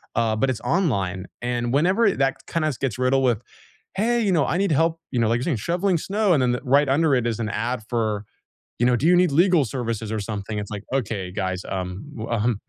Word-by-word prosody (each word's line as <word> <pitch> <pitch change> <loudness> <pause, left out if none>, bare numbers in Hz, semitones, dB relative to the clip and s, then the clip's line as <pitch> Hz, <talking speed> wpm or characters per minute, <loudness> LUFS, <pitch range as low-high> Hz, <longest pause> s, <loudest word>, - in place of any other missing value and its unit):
Uh, 115 -1 +1
but 135 +5 +1
it's 125 - -2
online, 100 - 0 0.2
and 120 0 -1
whenever 190 +8 +3
that 135 -3 0
kinda 160 -2 0
s 135 - -4
gets 130 -2 -3
riddled 135 +1 +2
with, 120 -3 +2 0.5
"Hey, 235 +4 +1
you 200 - +2
know, 160 -5 +3
I 175 - 0
need 195 -3 +1
help," 165 +2 +2
you 125 - 0
know, 115 - +2
like 115 - +2
you're - - -3
saying, 140 -7 0
"shoveling 175 - 0
snow," 200 +2 +1
and 140 - +3
then 125 - +2
the 125 - -3
right 140 +2 +3
under 145 0 +3
it 120 -2 0
is 115 -1 -2
an 110 -2 -2
ad 115 +3 -2
for, 110 -4 -1 0.6
you 120 - +2
know, 125 -1 +4
"Do 145 - 0
you 180 +1 +6
need 180 -3 +4
legal 170 -1 +4
services 115 -2 -3
or 110 - -1
something?" 105 0 -4
It's 105 0 -5
like, 105 -1 -5
"Okay, 105 -8 -2
guys, 95 -2 -2
um, 95 +6 -4
w 110 +1 -6
um" 115 -1 0
125 Hz, 240 wpm, -23 LUFS, 110-160 Hz, 0.6 s, you